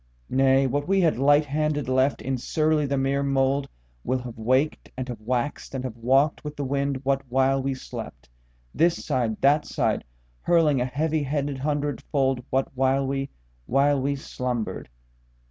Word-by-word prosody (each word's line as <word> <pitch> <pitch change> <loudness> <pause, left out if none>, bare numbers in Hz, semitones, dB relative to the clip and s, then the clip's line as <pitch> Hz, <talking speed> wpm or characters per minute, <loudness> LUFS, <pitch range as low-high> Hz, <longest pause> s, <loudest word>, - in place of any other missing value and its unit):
Nay, 135 0 +4
what 145 +3 -1
we 195 0 +3
had 160 -7 +2
lighthanded 145 +1 +2
left 130 +2 +1
in 135 0 -1
surly 155 +3 +1
the 140 0 0
mere 135 +1 +1
mouldWill 130 - -1
have 120 -2 -7
waked 130 +7 0
and 130 -1 -3
have 120 -4 -7
waxed 125 +5 -2
and 130 - -3
have 125 -4 -5
walked 135 +5 +2
with 150 0 -6
the 145 - -3
wind 140 0 -1
what 135 0 +2
while 135 +2 +2
we 135 0 -1
slept, 110 - -8 0.5
This 170 0 +1
side, 120 -7 -1
that 145 +2 +4
side - - 0 0.4
hurling 155 -6 +3
a - - +1
heavyheaded 145 -1 -1
hundredfoldWhat 135 -2 -1
while 135 +1 +1
we, 135 0 -2 0.4
while 140 +1 +3
we 140 +1 0
slumbered. 125 - -4
135 Hz, 150 wpm, -25 LUFS, 130-145 Hz, 0.5 s, Nay